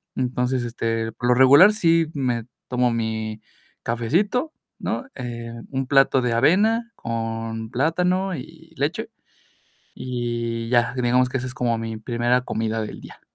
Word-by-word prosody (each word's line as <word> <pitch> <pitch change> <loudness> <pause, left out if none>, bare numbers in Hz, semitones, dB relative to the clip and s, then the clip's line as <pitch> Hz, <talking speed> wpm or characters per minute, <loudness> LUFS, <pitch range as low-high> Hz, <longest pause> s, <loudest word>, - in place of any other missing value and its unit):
Entonces, 125 0 0
este, 115 -1 -2
por 120 - -3
lo - - +6
regular 140 +11 +8
sí 165 -5 +3
me 125 -5 -1 0.2
tomo 125 -1 +2
mi 110 -1 -3 0.4
cafecito, 175 - 0 0.3
¿no?, - - -3
eh, 120 -2 -6 0.2
un 135 -1 -2
plato 135 -1 +4
de 120 - +1
avena 215 - +3
con 115 -1 -4
plátano 180 +7 +1
y 130 - -11
leche, - - -2 0.9
y 120 -2 -3
ya, 120 0 +3
digamos 125 0 +2
que 130 - -3
esa 125 - -4
es - - -7
como 120 -2 0
mi 115 0 -4
primera 120 +2 +1
comida 110 -1 -2
del 105 - -7
día. - - -13
125 Hz, 145 wpm, -23 LUFS, 115-135 Hz, 0.9 s, regular